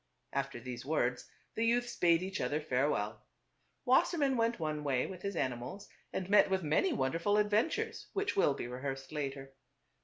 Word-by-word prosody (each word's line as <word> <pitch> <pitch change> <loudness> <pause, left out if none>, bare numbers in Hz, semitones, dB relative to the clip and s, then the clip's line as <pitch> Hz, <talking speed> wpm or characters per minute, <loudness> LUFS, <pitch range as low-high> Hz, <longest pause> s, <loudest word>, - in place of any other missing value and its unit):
After 135 -2 -2
these 125 0 -6
words 130 -4 -1 0.2
the 225 - -1
youths 240 +1 +1
bade 170 0 +4
each 190 +1 -3
other 150 - 0
farewell. 135 -6 0 0.6
Wassermann 280 0 +3
went 230 -2 +1
one 155 -2 -2
way 135 -3 +1
with 185 -2 -8
his 200 -1 -3
animals 130 +9 -3 0.2
and 185 - -3
met 205 0 +5
with 190 -1 0
many 155 - +2
wonderful 170 - +1
adven 210 +4 +3
tures 445 +7 -4
which 400 0 -1
will 145 -7 +3
be - - -4
rehearsed 135 +2 -5
later. 135 -2 -4
165 Hz, 165 wpm, -33 LUFS, 135-210 Hz, 0.6 s, met